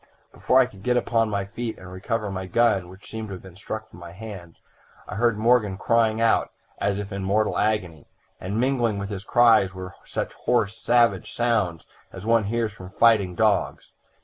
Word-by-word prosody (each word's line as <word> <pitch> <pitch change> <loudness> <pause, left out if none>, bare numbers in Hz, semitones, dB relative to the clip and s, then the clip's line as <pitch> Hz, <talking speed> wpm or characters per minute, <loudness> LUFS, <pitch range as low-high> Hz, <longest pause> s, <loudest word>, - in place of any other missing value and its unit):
"Before 130 - +3
I 130 - +6
could 100 -5 -14
get 125 +4 +1
upon 115 -2 +1
my 100 -1 -2
feet 110 +3 -5
and 90 -1 -11
recover 105 +2 -3
my 95 -1 -5
gun, 100 -3 +2
which 95 +2 -14
seemed 110 -1 -6
to 100 - -6
have 90 - -12
been 95 -2 -13
struck 110 +3 -6
from - - -15
my 85 -1 -10
hands, 95 -5 -10 0.5
I - - -7
heard 115 +2 +1
Morgan 110 -3 +2
crying 115 0 +2
out 115 0 +2 0.3
as 100 0 0
if 100 0 -5
in 100 -1 -4
mortal 105 +3 +1
agony, 90 -8 -1 0.3
and 100 +4 -3
mingling 120 -4 +1
with 100 +1 -5
his 100 -1 -5
cries 110 -6 +4
were 95 0 -7
such - - -4
hoarse 115 -4 0
savage 120 -5 +2
sounds 105 -9 0 0.3
as 95 +2 -9
one 115 -2 +3
hears 115 0 -1
from 95 -3 -11
fighting 100 -3 +3
dogs. - - 0
105 Hz, 195 wpm, -24 LUFS, 95-115 Hz, 0.5 s, I